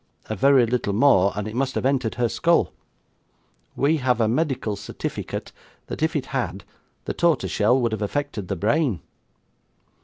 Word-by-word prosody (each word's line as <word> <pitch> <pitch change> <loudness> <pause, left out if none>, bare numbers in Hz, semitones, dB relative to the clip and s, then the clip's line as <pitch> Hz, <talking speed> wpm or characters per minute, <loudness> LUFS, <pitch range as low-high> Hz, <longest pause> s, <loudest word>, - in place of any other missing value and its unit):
A - - -1
very 135 +3 +5
little 115 -3 -1
more 100 -5 +4
and 105 0 -3
it 110 - -6
must 135 +2 -1
have - - -1
entered 130 -4 +1
her 120 -1 +1
skull. 170 +8 +2 1.0
We 150 +4 +2
have 125 -4 +1
a 110 - +3
medical 125 -4 0
certifiket - - -5 0.3
that - - -7
if 160 +1 +1
it 145 - -1
had, 100 -7 -2 0.4
the - - -2
tortershell 130 -7 +2
would 120 -2 0
have 110 -1 -3
affected 115 -2 -3
the 100 - -2
brain. 110 - +1
125 Hz, 160 wpm, -23 LUFS, 105-140 Hz, 1.0 s, very